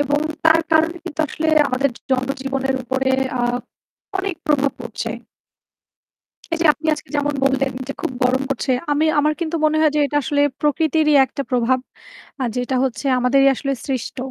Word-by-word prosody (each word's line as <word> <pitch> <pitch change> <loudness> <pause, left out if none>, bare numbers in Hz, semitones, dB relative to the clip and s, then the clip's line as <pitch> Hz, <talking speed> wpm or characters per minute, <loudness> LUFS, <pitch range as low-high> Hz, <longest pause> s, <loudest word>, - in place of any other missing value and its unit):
এবং 290 +1 0 0.3
তার 320 0 +6
কারণে 320 +2 +3
কিন্তু 315 -2 -4
আসলে 315 0 -2 0.2
আমাদের 265 +2 +1 0.2
জনজীবনের 270 +1 -1
উপরে, 265 +1 0 0.3
আ - - -1 0.8
অনেক 380 -2 -2
প্রভাব 285 -2 +2
পড়ছে। 235 -1 -5 1.4
এই 330 - 0
যে - - +4
আপনি 315 - -7
আজকে 300 - -12
যেমন 290 0 0
বললেন 270 0 +1 0.2
যে - - -2
খুব - - -2
গরম 255 +2 +2
পড়ছে। 270 -1 -1 0.2
আমি 300 +2 +2
আমার 300 +1 +3
কিন্তু 335 0 -1
মনে 310 0 +3
হয় 310 -1 +4
যে - - +3
এটা 290 - -3
আসলে 285 +3 0 0.2
প্রকৃতিরই 305 0 +2
একটা 280 +2 -5
প্রভাব, 250 +1 +2 0.6
আর 245 - 0
যেটা 250 +1 -1
হচ্ছে 250 0 -3
আমাদেরই 270 +2 +4
আসলে 275 +2 -2
সৃষ্ট। 260 -1 -3
275 Hz, 165 wpm, -20 LUFS, 260-305 Hz, 1.4 s, তার